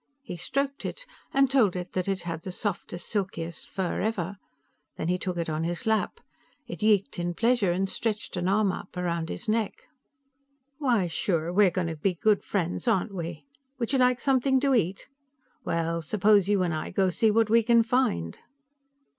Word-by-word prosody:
He 240 - -6
stroked 275 - -2
it, - - -5 0.3
and 275 0 +4
told 225 -9 +4
it 180 0 -5
that 185 0 -1
it 195 -2 -1
had 165 -2 -4
the 185 - -6
softest, 180 -3 -4
silkiest 170 -5 -3
fur 190 -2 -2
ever. 200 -3 -2 0.6
Then 160 - -2
he 180 0 +1
took 180 -2 -3
it 170 - -2
on 155 0 -2
his 175 +6 -2
lap. 220 -1 0 0.5
It - - -8
yeeked 210 -3 +2
in 175 0 -2
pleasure, 230 -4 +2
and 190 +2 0
stretched 220 +3 -2
an 180 0 -1
arm 200 0 +3
up 180 - -8
around 170 -2 -2
his 245 - -5
neck. 215 -1 -1 1.0
"Why, 245 -10 +2
sure; 170 -1 -1
we're 200 0 +5
going 180 0 -2
to 165 -1 -3
be 180 +4 0
good 210 +4 +2
friends, 180 +2 -2
aren't 205 -2 +1
we? 170 - -6 0.3
Would 245 +1 -2
you 270 - +3
like 250 -1 +4
something 265 0 +2
to 275 -1 +3
eat? 195 -5 0 0.6
Well, 165 0 -1
suppose 200 +3 +3
you 200 -3 +3
and 170 -2 0
I 155 - -3
go 190 0 +1
see 220 +6 +2
what 220 0 +2
we 230 0 +6
can 235 0 +4
find." 220 - 0
195 Hz, 190 wpm, -27 LUFS, 175-225 Hz, 1.0 s, we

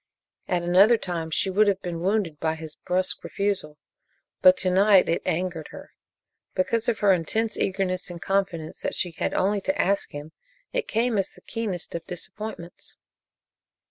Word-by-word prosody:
At 175 -1 0
another 195 +7 +6
time 170 -5 -4
she 190 +4 +1
would 210 +3 +4
have 195 -1 +1
been 170 -2 -4
wounded 185 -5 0
by 160 0 0
his 160 -1 -8
brusque 185 +3 -1
refusal, 195 -7 -2 0.6
but 275 0 +7
to 185 - +1
night 195 0 +5
it 165 - +1
angered 170 -2 -1
her. - - -11 0.6
Because 225 +5 +1
of 230 - 0
her 200 -2 +6
intense 215 +6 -1
eagerness 185 -2 -1
and 175 -1 -7
confidence 185 -5 -1
that - - -3
she 175 - 0
had 165 - -2
only 200 +2 +1
to 285 +8 -1
ask 200 +2 +1
him, 145 +2 -8 0.4
it - - -1
came 230 -1 +1
as 195 - 0
the - - -19
keenest 215 -7 -4
of 170 - -4
disappointments. 180 0 -7
185 Hz, 170 wpm, -25 LUFS, 170-205 Hz, 0.6 s, but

